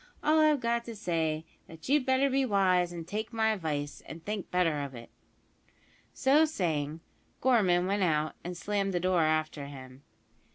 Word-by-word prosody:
All 310 +1 +4
I've 305 -2 +4
got 235 0 0
to 230 - -7
say 165 -6 -1
is, 155 - -11 0.2
that 160 -1 -12
you'd 280 -1 +2
better 260 +1 +3
be 270 0 +1
wise 185 -6 +2
and 170 -2 -7
take 215 +4 -4
my 220 -1 +1
advice, 150 -7 -4
and 165 0 -10
think 210 -2 -4
better 165 -5 +1
of 140 -2 -6
it." 115 0 -11 1.0
So 280 +4 +4
saying, 160 - -1 0.4
Gorman 195 -9 +3
went 200 +2 0
out, 155 -3 +1
and 175 0 -6
slammed 200 -2 -1
the - - +2
door 180 -1 +2
after 155 -2 0
him. 130 -1 -11
180 Hz, 175 wpm, -30 LUFS, 155-225 Hz, 1.0 s, All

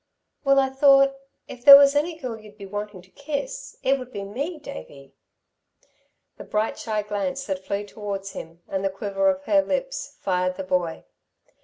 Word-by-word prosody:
"Well 275 -1 +4
I 265 -1 +2
thought 275 0 +5 0.3
if 245 - -11
there 280 +1 +12
was 280 0 +5
any 320 +3 0
girl 255 -7 -5
you'd 210 -1 -15
be 200 - -9
wanting 205 -1 -6
to 185 - -23
kiss, 310 - -5
it 270 +1 +2
would 255 0 -9
be 200 -3 -5
me, 280 - -4
Davey!" 210 - -11 1.2
The - - -9
bright 215 +1 -2
shy 215 -2 -2
glance 270 +7 -3
that 190 -2 -4
flew 200 +2 -3
towards 200 -1 -6
him, 165 +1 -10
and 195 0 -3
the 195 - +1
quiver 195 0 0
of 190 0 -1
her 295 +8 +3
lips, - - -3
fired 185 -1 0
the - - -4
boy. 180 -3 -1
210 Hz, 180 wpm, -24 LUFS, 195-275 Hz, 1.2 s, there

